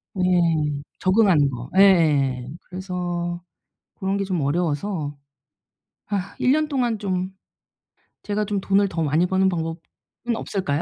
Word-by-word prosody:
네. 185 - 0 0.8
적응하는 185 -7 +4
거 125 -1 -7
예예예 145 -10 +4 0.2
그래서 175 -2 -3 0.5
고런 195 +1 -1
게 200 - -1
좀 185 -4 -1
어려워서 150 +1 -1 0.9
아 195 -2 -3
1 255 - +3
년 305 +2 +2
동안 245 -6 0
좀 185 -2 -2 0.9
제가 210 0 -1
좀 205 -1 -1
돈을 195 +1 +2
더 165 -3 -2
많이 155 +4 +2
버는 190 +1 +2
방법은 165 -1 -3 0.6
없을까요? 165 -9 -2
185 Hz, 235 characters per minute, -23 LUFS, 160-195 Hz, 0.9 s, 적응하는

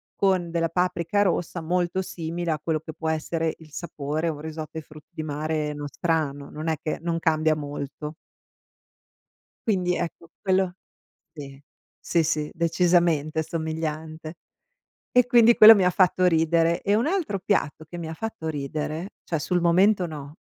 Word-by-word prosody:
con 185 -3 +1
della 165 0 0
paprika 180 +3 +1
rossa 175 -2 -1
molto 175 +2 0
simile 170 -1 -4
a 155 - -1
quello 160 -2 0
che 160 +1 -9
può 160 +1 -3
essere 160 +1 -1
il 155 -2 -15
sapore, 155 0 -3
o 155 - -3
un 145 - -10
risotto 160 0 -6
ai 160 - -5
frutti 150 0 -15
di 155 - -5
mare 150 0 -2
nostrano, 145 -1 -2
non 155 +2 -6
è 160 - +1
che 155 - -3
non 170 0 -1
cambia 155 -1 +2
molto. 145 0 -6 1.5
Quindi, 180 -4 +1
ecco, 165 0 -5
quello 190 -2 +1 0.6
sì. 140 -2 -10 0.4
Sì, 170 - +1
sì. 155 -1 -1
Decisamente 165 -2 +2
somigliante. 160 0 -4 0.8
E 250 -1 +5
quindi 235 -1 +6
quello 220 0 +11
mi 195 -3 +2
ha - - +6
fatto 185 0 +3
ridere. 165 0 +2
E 200 - +2
un 230 +6 +1
altro 325 - -1
piatto 160 -6 -1
che 175 - -8
mi 170 -2 -5
ha - - -5
fatto 220 -2 -5
ridere, 155 +4 -4
cioè 165 - -2
sul 175 +3 0
momento 185 +3 +4
no, 150 -2 -8
165 Hz, 160 wpm, -25 LUFS, 155-180 Hz, 1.5 s, quello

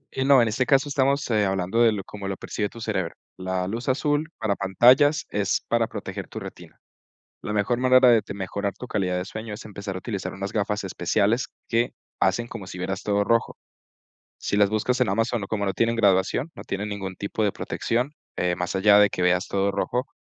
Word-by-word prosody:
Y 130 - 0
no, 135 -2 +6
en 115 - +3
este 125 +4 0
caso 135 +1 +3
estamos, 140 0 +1
eh, 105 -2 +3
hablando 95 +4 0
de 115 - +6
lo 100 -3 -3
como 100 -1 -8
lo 95 -1 -3
percibe 105 -1 -3
tu 115 - -12
cerebro. 95 -6 -2 0.2
La 95 0 -2
luz 115 +6 -3
azul 145 +4 0
para 105 -3 0
pantallas 125 - +4
es 100 -1 0
para 115 -1 +2
proteger - - -6
tu - - -7
retina. - - -11 0.6
La - - -4
mejor 105 +4 +1
manera 130 0 +6
de 115 -2 +5
mejorar 100 +1 -3
tu 125 - -8
calidad 95 -5 -1
de 90 - -3
sueño 110 +3 -7
es - - -9
empezar 100 -2 -6
a - - -3
utilizar 95 -4 -4
unas 100 0 -5
gafas 105 -1 -1
especiales 105 +7 0 0.2
que 120 +1 +1 0.3
hacen 105 +5 +2
como 115 -5 -8
si 90 - -8
vieras 95 +2 -3
todo 100 0 +1
rojo. 115 +2 +1 0.8
Si 100 - -2
las 100 -1 +4
buscas 120 +4 0
en 120 - +3
Amazon, 115 +1 0
como 100 -1 -1
no 95 - -1
tienen 115 0 +1
graduación, 100 - +2
no - - -9
tienen 105 +2 -4
ningún 95 -2 -5
tipo 100 +3 -3
de 100 - +2
protección, 125 +5 -2 0.2
eh, 90 0 0
más 90 +1 -3
allá 100 +2 +6
de 105 -1 +6
que 90 - -4
veas 90 +2 +2
todo 100 0 0
rojo, 125 +7 -1
105 Hz, 210 wpm, -24 LUFS, 95-120 Hz, 0.8 s, no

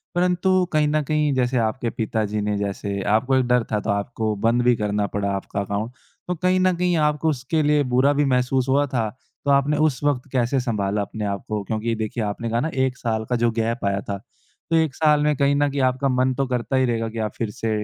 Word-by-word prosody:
परंतु 180 +1 +2 0.2
कहीं 150 -1 +3
न 155 +1 +1
कहीं 150 -2 +2
जैसे 125 0 +1
आपके 115 +1 -3
पिता 110 0 0
जी 105 +1 -2
ने 105 0 -1
जैसे 100 0 -3
आपको 130 +4 +2
एक 130 -1 +3
डर 125 -1 +3
था 105 - +1
तो 105 - -5
आपको 105 +1 -1
बंद 120 +1 +3
भी 125 -1 +4
करना 105 -1 -1
पड़ा 100 0 -1
आपका 100 +1 -4
अकाउंट। 100 +4 -3 0.4
तो 180 - -1
कहीं 185 +2 +1
न 185 -1 +3
कहीं 180 -1 +1
आपको 150 +2 -1
उसके 145 +3 -1
लिए 150 0 +3
बुरा 135 +3 +4
भी 145 0 +2
महसूस 125 +1 +1
हुआ 140 +2 +3
था, 115 -5 -1 0.4
तो 140 - +3
आपने 140 +2 +3
उस 135 -1 -4
वक़्त 140 -2 0
कैसे 130 +1 +1
सँभाला 105 -4 -1
अपने 105 +1 -4
आप 100 -1 -3
को? 105 -2 -2
क्योंकि 110 +3 -2
देखिए 110 +1 -3
आपने 105 +3 -3
कहा 115 +1 0
ना 160 - -1
1 130 -1 0
साल 110 -2 -2
का 125 - +1
जो 115 - +3
गैप 115 0 -2
आया 100 0 +1
था, 100 - -2 0.5
तो 165 - +2
1 160 -4 +2
साल 150 -2 +3
में 150 -1 +2
कहीं 140 0 +3
न 145 0 +2
कहीं 140 -1 -1
आपका 130 +1 +1
मन 130 0 +2
तो 135 - +1
करता 125 +1 -2
ही 130 0 +3
रहेगा 115 -2 -1
कि 115 0 -6
आप - - -11
फिर 115 -3 -2
से 115 +2 -4
125 Hz, 240 wpm, -23 LUFS, 110-145 Hz, 0.5 s, भी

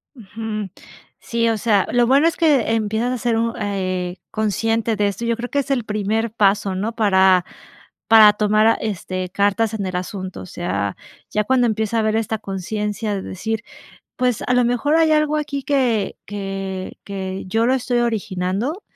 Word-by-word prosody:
Ujú. 215 -2 -5 0.5
Sí, 230 0 0
o 225 - +1
sea, 205 -3 +2
lo 240 -1 +3
bueno 275 +6 +4
es 335 - 0
que 290 -8 +3
empiezas 220 +2 0
a 255 - -2
ser 230 -1 0
un 230 0 0
eh, 185 -3 -2
consciente 225 +1 0
de 205 0 +1
esto. 200 +4 -3
Yo 235 0 +1
creo 245 +1 -5
que 285 - 0
es 280 0 -3
el 245 -5 0
primer 215 +2 -1
paso, 200 -3 +2
¿no?, 215 +5 -2
para 190 -4 +4 0.6
para 215 -2 +8
tomar 215 +1 +3
a 225 - +6
este, 185 -3 -4
cartas 205 +3 +1
en 200 -3 -3
el 185 - -4
asunto. 185 0 -5
O - - -8
sea, 100 - -3 0.4
ya 210 -1 0
cuando 255 0 +3
empieza 220 +1 -1
a - - +3
haber 215 0 +1
esta 220 0 -1
conciencia 210 +2 -3
de 190 - -4
decir, 220 +4 -4 0.5
pues, 250 -3 0
a - - +1
lo 250 - +4
mejor 245 +6 +1
hay 320 -1 +4
algo 305 0 +2
aquí 285 -2 -3
que 250 -8 0
que 195 -2 -5
que 190 -1 -5
yo 225 +4 +1
lo 260 - +3
estoy 245 -1 0
originando. 220 - -2
220 Hz, 185 wpm, -20 LUFS, 195-235 Hz, 0.6 s, para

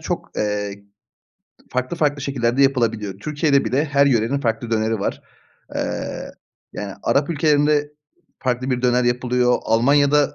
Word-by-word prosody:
çok, - - -4
eee, 105 -1 -2 0.9
farklı 130 +6 -2
farklı 145 -2 +1
şekillerde 130 -1 +1
yapılabiliyor. 115 -7 0
Türkiye'de 145 +2 +1
bile 140 +4 +1
her 140 -2 +3
yörenin 125 +2 +1
farklı 115 -1 -2
döneri 110 -1 0
var. - - -3 0.5
Eee, - - -4 0.4
yani, 100 -2 -6
Arap 140 +4 +1
ülkelerinde 150 -1 +2 0.5
farklı 130 0 -1
bir 125 -1 -1
döner 125 0 +3
yapılıyor, 125 0 +1
Almanya'da 140 +5 +3
125 Hz, 130 wpm, -21 LUFS, 115-145 Hz, 0.9 s, her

